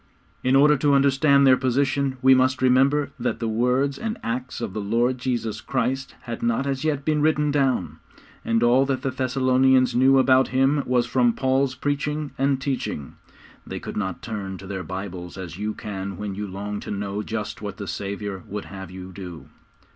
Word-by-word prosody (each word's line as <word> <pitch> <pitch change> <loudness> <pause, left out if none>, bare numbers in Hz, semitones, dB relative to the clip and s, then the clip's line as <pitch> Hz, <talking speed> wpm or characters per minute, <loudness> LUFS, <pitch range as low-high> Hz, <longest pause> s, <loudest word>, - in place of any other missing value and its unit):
In 130 +1 +3
order 150 +2 +6
to 140 +1 +3
understand 140 0 +4
their 130 -1 +7
position 130 +1 0
we 130 0 +7
must 130 0 +2
remember 135 +3 +3
that 125 - -1
the 115 - -2
words 125 +5 +1
and 225 +1 -3
acts 125 +2 -3
of - - -4
the 105 - -3
Lord 120 +5 +1
Jesus 115 -4 -2
Christ 130 +2 -2
had 120 -2 -6
not 115 +3 0
as 135 0 -2
yet 145 -3 -1
been 155 -1 +1
written 150 -1 +2
down, 135 -9 0 0.4
and 115 0 +1
all 125 +3 +5
that 130 -2 -1
the 135 - 0
Thessalonians 130 -1 +3
knew 130 +2 +5
about 130 0 +5
Him 135 +3 +2
was 125 -1 +2
from 120 -1 +2
Paul's 130 +1 +1
preaching 145 +2 -2
and 135 0 +2
teaching. 130 - -4 0.5
They - - -6
could - - -7
not 95 -4 -3
turn 100 -4 -5
to 95 - -11
their 95 -1 -4
Bibles 90 -1 -6
as 90 -1 -7
you 105 +1 -2
can 100 -2 -5
when 105 0 -4
you 105 +1 -4
long 100 +2 -5
to - - -9
know 100 0 -3
just 110 -1 -5
what 105 -1 -6
the 100 - -5
Saviour 100 -1 -4
would 105 0 -5
have 95 -2 -9
you 95 0 -9
do. 90 -3 -9
125 Hz, 190 wpm, -24 LUFS, 105-135 Hz, 0.5 s, their